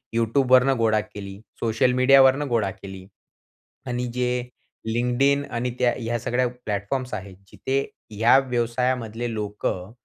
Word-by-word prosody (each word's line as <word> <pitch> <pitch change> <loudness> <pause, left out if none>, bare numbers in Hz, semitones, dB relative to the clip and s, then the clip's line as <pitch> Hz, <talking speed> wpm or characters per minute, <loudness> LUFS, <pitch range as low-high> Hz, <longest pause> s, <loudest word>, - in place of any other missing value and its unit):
Youtubeवरुन 125 +3 +3
गोळा 110 -2 +2
केली, 100 -2 -10 0.2
सोशल 115 +2 +1
मीडियावरनं 135 +2 +5
गोळा 110 -5 0
केली. 95 0 -10 0.8
आणि 125 0 -2
जे 125 0 0 0.7
LinkedIn 135 +4 +2
आणि 120 +1 -2
त्या 125 -1 +3
ह्या 120 0 -2
सगळ्या 125 +2 0 0.2
प्लॅटफॉर्म्स 105 +5 -3
आहेत. 95 -2 -9
जिथे 135 +1 -1 0.4
या 115 +4 +6
व्यवसायामधले 120 -1 -1
लोकं 105 -3 -4
120 Hz, 120 wpm, -24 LUFS, 110-125 Hz, 0.8 s, या